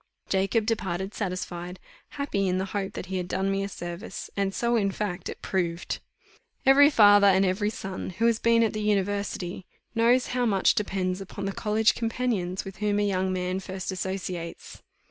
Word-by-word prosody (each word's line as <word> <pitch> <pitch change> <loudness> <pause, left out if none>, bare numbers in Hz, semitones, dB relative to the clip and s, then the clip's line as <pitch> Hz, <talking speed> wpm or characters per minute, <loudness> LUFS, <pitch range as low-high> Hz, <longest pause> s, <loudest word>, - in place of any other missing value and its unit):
Jacob 195 +3 +1
departed 195 -3 -2
satisfied 180 -2 -4 0.4
happy 205 -9 0
in 180 0 +1
the 190 - -1
hope 195 -2 -2
that - - -5
he 190 0 -3
had 180 -1 -3
done 190 +1 0
me 195 0 0
a 200 - -3
service; 175 -1 -7
and 195 -1 0
so 235 0 +1
in 200 -4 +2
fact 195 -2 -3
it - - -8
proved. 175 -2 -2 0.7
Every 280 +2 +8
father, 205 -6 +7
and 195 0 +5
every 195 +3 +1
son, 195 -3 -5
who 200 +5 -1
has 230 -1 +3
been 230 0 +4
at 225 - +1
the 215 - -3
university, 200 -3 -1 0.3
knows 240 +2 +3
how 245 -1 +1
much 195 -3 +3
depends 190 -2 -1
upon 195 +1 -6
the 195 - -1
college 215 +2 +2
companions 225 -6 -2
with 195 0 -8
whom 210 0 0
a 205 - +2
young 190 -1 0
man 185 0 -1
first 190 0 -5
associates. 185 -2 -5
195 Hz, 185 wpm, -27 LUFS, 185-215 Hz, 0.7 s, Every